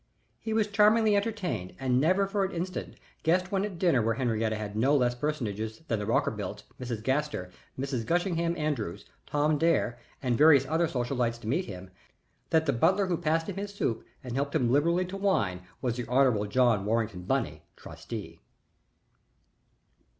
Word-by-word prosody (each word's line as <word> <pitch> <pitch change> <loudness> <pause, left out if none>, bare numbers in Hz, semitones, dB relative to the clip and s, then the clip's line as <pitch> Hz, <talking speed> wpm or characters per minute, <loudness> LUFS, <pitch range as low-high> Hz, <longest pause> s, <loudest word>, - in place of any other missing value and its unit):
He 220 - -5
was 220 -1 +2
charmingly 210 +1 +4
entertained 195 - -2
and 130 -1 +2
never 185 +6 +3
for 195 0 0
an 190 - -1
instant 180 +2 -4 0.3
guessed 180 +3 +1
when 195 -1 +1
at 205 -4 -4
dinner 165 -8 +3
where 115 0 +1
Henriette 115 -3 0
had 105 -1 -4
no 135 +7 +3
less 125 -2 +2
personages 115 -4 -3
than 115 - 0
the 105 - -4
Rockerbilts, - - -1 0.2
Mrs. 120 -4 -4
Gaster, 130 -8 -1 0.3
Mrs. 130 -3 -2
Gushington 170 -1 0
Andrews, 150 - -2 0.2
Tommy 150 +1 +1
Dare, 145 -7 +1 0.2
and 125 -3 0
various 145 -3 +7
other 160 +4 +1
social 125 -1 -2
lights 120 -2 0
to 115 - -10
meet 165 +11 0
him, 95 -2 -9 0.6
that 160 0 +3
the 140 - +2
butler 190 - +3
who 180 -2 0
passed 160 +1 0
him - - -5
his 205 0 -5
soup 115 - -1 0.2
and 125 -2 -6
helped 140 +3 -1
him 125 -6 +2
liberally 170 +6 +3
to 185 +2 -7
wine 105 - +1 0.2
was 120 -2 0
the 120 -2 -4
Hon. 125 -5 +3
John 120 -3 +3
Warrington 110 -3 -1
Bunny, 90 - -1
trustee. - - -8
140 Hz, 170 wpm, -29 LUFS, 115-175 Hz, 0.6 s, various